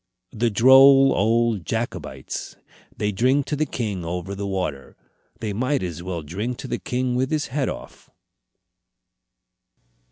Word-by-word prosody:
The 115 +1 0
droll 135 +4 +7
old 115 0 +1
Jacobites! 80 - -5 0.4
They 105 - 0
drink 130 +7 +2
to 150 - -2
the 155 +1 -1
king 105 -7 -3
over 90 +3 -4
the 100 0 -4
water. 90 -9 -4 0.4
They 105 -2 -3
might 130 +4 0
as 85 -2 -5
well 85 -2 -5
drink 105 +11 -4
to - - -7
the - - -3
king 125 0 -2
with 130 +2 0
his 155 -4 -1
head 140 -2 0
off! - - -9
110 Hz, 140 wpm, -23 LUFS, 95-130 Hz, 0.4 s, droll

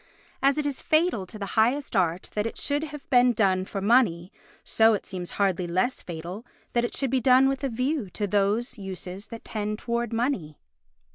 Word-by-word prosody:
As 275 +1 +3
it 300 - -1
is 285 -2 -2
fatal 310 - +1
to 215 - -9
the 200 - -4
highest 245 +4 +1
art 175 -2 0
that 210 +1 0
it - - -7
should 290 +2 0
have 295 -2 -10
been 245 -1 +5
done 190 -4 +2
for 195 0 -5
money, 195 -6 +3 0.3
so 225 0 +4
it 200 - -6
seems 180 -2 -5
hardly 190 -3 +1
less 185 +9 0
fatal 175 +5 -7 0.3
that 240 - +2
it 240 - -2
should 270 -3 0
be 260 -1 +2
done 255 +2 +6
with 270 0 -1
a 275 - 0
view 255 -1 -1
to 205 +3 -3
those 205 +5 0
uses 190 0 -7
that 230 +1 -10
tend 210 -1 -3
towards 235 0 -2
money. 225 - -1
220 Hz, 200 wpm, -26 LUFS, 190-255 Hz, 0.3 s, done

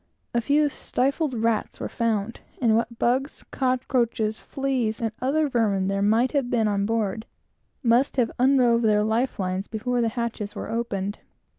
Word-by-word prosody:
A 235 - +2
few 295 +4 +3
stifled 275 +1 -1
rats 225 -1 -1
were - - -3
found; 230 -1 -1 0.2
and 230 -4 +3
what 230 0 -1
bugs, 260 +5 0
cockroaches, 245 -4 0
fleas, 260 -5 -2
and 225 -2 -1
other 295 +4 +2
vermin, 205 -7 +1
there 195 0 0
might 225 +5 +3
have 275 -4 0
been 225 -3 +2
on 200 -1 0
board, 220 -1 -1 0.6
must 245 +4 +3
have 240 -3 +2
unrove 250 -3 +4
their 210 -2 +3
life 225 +4 0
lines 185 0 -2
before 240 +2 -1
the 230 - +2
hatches 225 -3 -3
were - - -5
opened. 205 -4 -2
230 Hz, 160 wpm, -25 LUFS, 215-255 Hz, 0.6 s, unrove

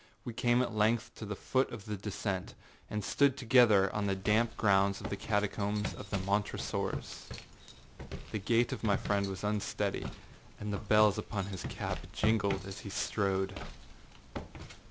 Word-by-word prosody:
We 120 - -4
came 120 +2 +3
at 115 - -3
length 110 +2 +1
to 110 - -6
the 105 - -3
foot 130 +6 +1
of 110 -4 -8
the 105 -1 -3
descent, 100 -1 -3 0.3
and 105 -1 -2
stood 140 +5 +3
together 115 -6 +5
on 105 -1 0
the 95 - +1
damp 110 +4 +1
ground 100 -1 +3
of - - -6
the - - 0
catacombs 105 0 -1
of - - -9
the 100 - 0
Montresors. 100 +2 -2 1.0
The 110 - -2
gait 115 +4 +2
of - - -5
my 100 -3 +3
friend 100 -1 0
was 95 0 -5
unsteady, 105 0 -1 0.5
and 105 0 -3
the - - 0
bells 105 -1 +4
upon 100 -2 -3
his 95 - -5
cap - - -3
jingled 100 -3 +1
as 95 0 -7
he 100 - -8
strode. 95 -1 0
105 Hz, 160 wpm, -32 LUFS, 100-110 Hz, 1.0 s, together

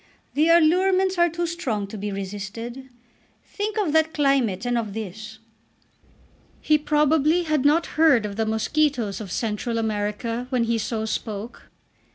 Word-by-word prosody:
The 310 +3 +2
allurements 370 +3 +3
are 345 0 +5
too 340 +2 -2
strong 260 - -2
to 200 - -9
be 205 0 -4
resisted. 205 +6 -6 0.6
Think 425 +1 -4
of 380 -8 0
that 320 0 +2
climate 265 -9 +1
and 245 0 0
of 215 -4 -2
this." 215 +1 -7 1.2
He 305 0 +2
probably 300 +3 +2
had 305 -4 0
not 315 +4 +4 0.2
heard 275 -9 +5
of 200 -1 -5
the 220 0 -1
mosquitoes 225 -1 0
of 195 -4 -8
Central 230 +2 -2
America 220 +2 -2
when 250 -3 +1
he 230 0 0
so 220 0 -2
spoke. 220 0 -5
245 Hz, 150 wpm, -24 LUFS, 215-310 Hz, 1.2 s, are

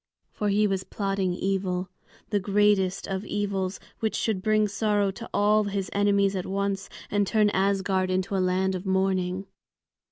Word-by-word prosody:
For 210 - -1
he 210 +1 +3
was 195 -2 0
plotting 195 -3 -1
evil, 185 -1 -1 0.4
the 205 - +2
greatest 200 -1 +2
of 195 0 -3
evils, 195 -3 -2 0.2
which 220 -1 -1
should 215 -5 0
bring 215 +1 +3
sorrow 205 -1 +1
to 230 +4 -9
all 210 +1 +3
his 195 -2 -3
enemies 200 -1 +2
at 185 - -3
once 195 0 -2 0.2
and 205 -1 +2
turn 210 -1 +3
Asgard 190 -1 +1
into 185 +1 -1
a 190 - +2
land 185 +1 +1
of 185 -1 -4
mourning. 190 -1 0
195 Hz, 160 wpm, -26 LUFS, 190-205 Hz, 0.4 s, he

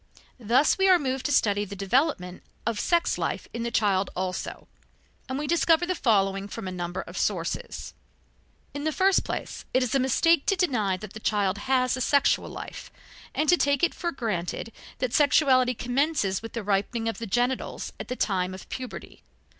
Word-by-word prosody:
Thus 250 - +3
we 385 0 +4
are 370 - +7
moved 265 -4 -2
to - - -2
study 205 -6 +3
the 200 0 -7
development 195 - 0 0.2
of 230 -2 -1
sex 340 -1 +1
life - - -2
in 235 - -4
the 235 - -1
child 200 -4 +1
also, 185 0 -4 0.6
and 260 - -2
we 295 - -2
discover 335 +1 +3
the 370 - 0
following 195 - +1
from 210 -1 -6
a - - -3
number 175 +1 -4
of - - -7
sources: - - -2 0.8
In 285 - -5
the 315 - +1
first 380 +4 +3
place, - - -5
it 255 - +4
is 250 - -2
a 275 - +3
mistake 275 +5 +3
to 390 - +3
deny 220 - +1
that 215 +1 -10
the 220 - -7
child 205 -3 0
has 255 -2 +3
a 255 - -4
sexual 280 +2 +2
life, - - -8 0.5
and 310 - +1
to 355 - +6
take 285 -1 +1
it 345 - +3
for 345 -1 -3
granted 220 - -3 0.3
that 255 -3 -2
sexuality 260 -4 +4
commences 245 -5 0
with 225 - -8
the 230 - -4
ripening 205 +3 0
of 225 - -2
the 230 - -5
genitals 245 +5 -1
at - - -6
the 250 - -3
time 185 -5 -1
of 190 - -11
puberty. 255 -1 -7
245 Hz, 190 wpm, -26 LUFS, 200-285 Hz, 0.8 s, are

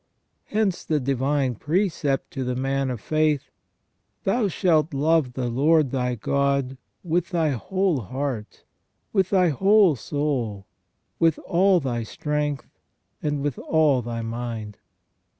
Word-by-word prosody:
Hence 210 -4 0
the 155 -2 0
divine 135 0 0
precept 150 - -1
to 135 - -3
the 125 0 -2
man 135 +1 -1
of 125 -3 -3
faith: 155 +2 0 0.3
" - - -49
Thou 215 +2 +1
shalt 160 -5 +1
love 150 -2 +2
the 125 -1 -2
Lord 145 +3 +3
thy 125 -2 -1
God 140 +2 0 0.2
with 170 0 0
thy 165 -3 +1
whole 185 - 0
heart, 125 0 -5 0.5
with 190 -3 +2
thy 185 -3 +4
whole 195 +2 +4
soul, 125 -8 -2 0.5
with 165 -2 +3
all 190 +1 +4
thy 125 -5 -2
strength, 150 +4 -3 0.4
and 145 -2 -1
with 145 -4 -2
all 150 -5 +2
thy 115 -1 -4
mind 115 -2 -5
145 Hz, 130 wpm, -24 LUFS, 125-165 Hz, 0.5 s, thy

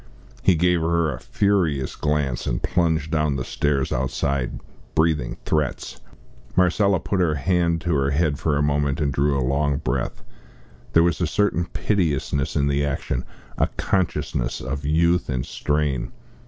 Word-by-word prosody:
He 95 - +4
gave 90 +1 +2
her 80 -2 +1
a - - -7
furious 85 -10 0
glance, 75 -4 -1
and - - -2
plunged 80 -3 +1
down 75 -2 +1
the 65 - -2
stairs 70 -2 0
outside, 65 0 -1 0.4
breathing 80 -6 +1
threats. 75 -4 -2 0.5
Marcella 95 +1 +3
put 95 +4 -2
her 85 -4 +2
hand 85 +2 +1
to 85 0 0
her 70 -1 +2
head 75 0 +1
a 75 -2 +2
moment, 70 -1 +1
and 70 -3 0
drew 70 +1 +2
a 65 - 0
long 70 +1 +1
breath. - - -3 0.7
There 85 - +6
was 85 +1 +1
a 85 - +2
certain 90 -1 +1
piteousness 80 -8 -1
in 70 - +2
the 70 0 +1
action, 65 -3 -2 0.3
a - - +3
consciousness 80 -9 -1
of 70 +2 -4
youth 85 +3 +2
and 65 -3 -1
strain. 75 -3 -1
75 Hz, 155 wpm, -23 LUFS, 70-85 Hz, 0.7 s, There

